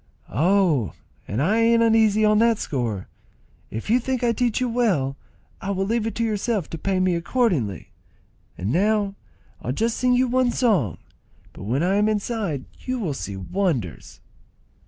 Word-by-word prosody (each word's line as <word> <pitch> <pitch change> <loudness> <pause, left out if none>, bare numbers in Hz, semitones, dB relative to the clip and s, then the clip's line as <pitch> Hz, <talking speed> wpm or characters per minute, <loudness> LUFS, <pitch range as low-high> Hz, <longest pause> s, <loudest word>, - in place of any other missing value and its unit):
"Oh, 155 - +2 0.4
I 155 - +1
ain't 230 0 +4
uneasy 220 -2 +4
on 210 0 +4
that 230 -1 +4
score. 115 - -3 0.6
If 110 - -6
you 235 +3 +4
think 255 0 -2
I 235 - +3
teach 235 0 0
you 255 - 0
well, 200 - +1 0.5
I 195 - -4
will 195 -1 0
leave 225 +1 0
it 225 - -4
to 230 - -1
yourself 215 -4 -1
to 165 - -5
pay 190 +2 0
me 185 -1 +2
accordingly. 170 - 0 0.7
And 95 +5 -2
now 205 +4 +2 0.5
I'll 125 - -2
just 225 - 0
sing 250 -1 +2
you 255 +1 +3
one 255 0 +2
song, 200 - +1 0.6
but - - -9
when 130 +9 0
I 190 +3 +2
am 210 +1 +3
inside 205 - -2
you 255 0 -3
will 185 - -2
see 100 -5 -5
wonders." 125 - -3
200 Hz, 165 wpm, -23 LUFS, 145-230 Hz, 0.7 s, ain't